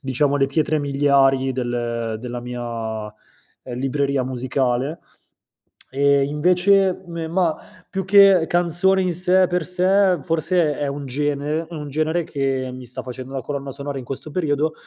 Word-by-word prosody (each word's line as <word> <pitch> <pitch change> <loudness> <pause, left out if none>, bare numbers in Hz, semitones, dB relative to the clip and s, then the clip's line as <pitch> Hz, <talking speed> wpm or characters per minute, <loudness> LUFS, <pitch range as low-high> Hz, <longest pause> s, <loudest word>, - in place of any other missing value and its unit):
diciamo, 140 +1 0
le 135 -1 +2
pietre 155 +2 0
miliari 135 -2 +2
del 120 -2 -2
della 120 +1 -6
mia, 115 -3 -5
uhm, 105 0 -10 0.6
libreria 135 0 0
musicale. 130 +3 -1 0.9
E, 140 +1 +3
invece, 180 +6 +2
me 170 -2 -5
mah, 170 -1 +1 0.3
più 190 -1 -3
che 195 -3 +6
canzone 175 +2 +2
in 180 -1 0
sé 180 +2 +3
e 185 - +5
per 180 -1 -1
sé, 185 +1 +3
forse 165 0 +1
è 145 - -2
un 140 0 -5
gene 145 +3 -1
un 150 -3 -6
genere 155 +4 -1
che 135 -3 -2
mi 130 0 -9
sta 125 - -4
facendo 130 +1 -8
da 135 - -3
colonna 140 +1 -5
sonora 140 +1 -5
in 130 - -7
questo 135 +4 -7
periodo, 155 -2 0
145 Hz, 155 wpm, -21 LUFS, 130-170 Hz, 0.9 s, che